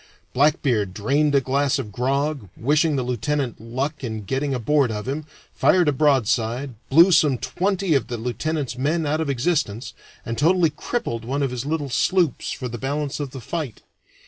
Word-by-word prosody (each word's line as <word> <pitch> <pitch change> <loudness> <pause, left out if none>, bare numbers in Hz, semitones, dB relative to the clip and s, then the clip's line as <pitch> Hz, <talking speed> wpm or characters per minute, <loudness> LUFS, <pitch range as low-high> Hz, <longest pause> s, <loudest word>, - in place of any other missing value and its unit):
Blackbeard 125 - +2
drained 140 +7 +1
a 140 - +5
glass 140 +2 +1
of 120 -6 -5
grog, 135 0 -1
wishing 150 +4 +2
the 130 - 0
lieutenant 125 0 -2
luck 135 +6 -3
in 110 -3 -4
getting 135 +6 -2
aboard 135 +2 +2
of 105 +1 -4
him, 145 +3 -3 0.3
fired 180 -3 +3
a - - +5
broadside, 130 -2 +1 0.2
blew 170 +7 +7
some 150 -5 +4
twenty 185 - 0
of 135 -4 +1
the 120 - -4
lieutenant's 130 +3 -3
men 155 +4 0
out 155 +2 0
of 155 - -2
existence, 135 -4 -1 0.3
and 115 0 -3
totally 165 +1 +3
crippled 145 - -3
one 140 +5 -1
of 135 - -1
his 125 +2 -4
little 150 -3 -2
sloops 175 0 +1
for 130 - -4
the 120 -1 -6
balance 145 +3 -2
of 145 -2 -3
the 130 - -8
fight. 145 -2 -5
140 Hz, 175 wpm, -23 LUFS, 120-150 Hz, 0.3 s, blew